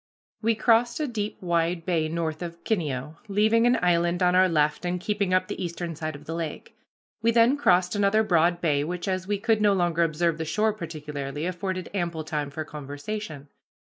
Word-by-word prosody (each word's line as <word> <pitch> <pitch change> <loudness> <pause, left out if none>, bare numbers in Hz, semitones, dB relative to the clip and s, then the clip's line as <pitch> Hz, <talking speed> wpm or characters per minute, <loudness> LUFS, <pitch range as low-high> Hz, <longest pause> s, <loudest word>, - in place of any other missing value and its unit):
We 225 0 +2
crossed 235 +3 +3
a 305 - 0
deep 215 -4 -4
wide 170 -1 0
bay 165 -4 0
north 160 -1 -3
of 170 -1 -7
Kineo, 150 - -2
leaving 220 +3 +3
an 245 - +4
island 175 +1 +2
on 180 0 +4
our 185 0 +5
left 150 -1 +1
and 180 0 -1
keeping 200 0 -1
up 185 0 +2
the - - -4
eastern 170 -1 -4
side 155 0 -4
of 145 +1 -12
the 165 - -5
lake. 165 -2 -5 0.5
We 230 - +3
then 230 +3 +5
crossed 180 -11 +3
another 205 +2 +3
broad 175 -3 +2
bay, 145 -4 +2
which, 175 +4 -4
as 185 -1 -2
we 205 0 0
could 225 +1 +1
no 205 -1 +4
longer 175 -3 +1
observe 165 0 +1
the - - -1
shore 215 +7 +1
particularly, 150 -5 -5
afforded 185 0 -3
ample 170 -4 -2
time 150 -2 -3
for 155 +2 -5
conversation. 150 +2 -6
175 Hz, 195 wpm, -26 LUFS, 160-205 Hz, 0.5 s, our